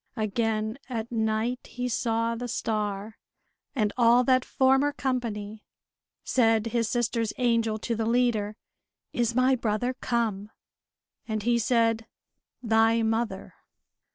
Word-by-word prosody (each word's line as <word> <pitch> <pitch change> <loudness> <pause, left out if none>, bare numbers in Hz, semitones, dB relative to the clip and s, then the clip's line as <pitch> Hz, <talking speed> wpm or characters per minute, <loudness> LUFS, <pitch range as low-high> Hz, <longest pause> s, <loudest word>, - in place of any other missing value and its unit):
Again 220 +2 -1
at 230 -2 -4
night 220 +2 0
he 250 0 -2
saw 230 -1 0
the 245 +1 -4
star, 210 -2 -3 0.6
and 210 -5 +1
all 240 +1 +5
that 255 0 +3
former 265 +2 +3
company. 220 -6 -3 0.6
Said 225 -3 +2
his 230 -1 0
sister's 230 -2 0
angel 230 -3 +1
to 230 +2 -3
the 225 0 -1
leader: 230 -3 +1 0.6
"Is 235 -1 0
my 255 +1 +4
brother 230 +1 -1
come?" 225 -5 -2 0.8
And 215 -2 -2
he 235 +1 +2
said, 230 -1 +1 0.6
"Thy 225 0 +3
mother!" 220 -3 -2
230 Hz, 120 wpm, -27 LUFS, 220-245 Hz, 0.8 s, all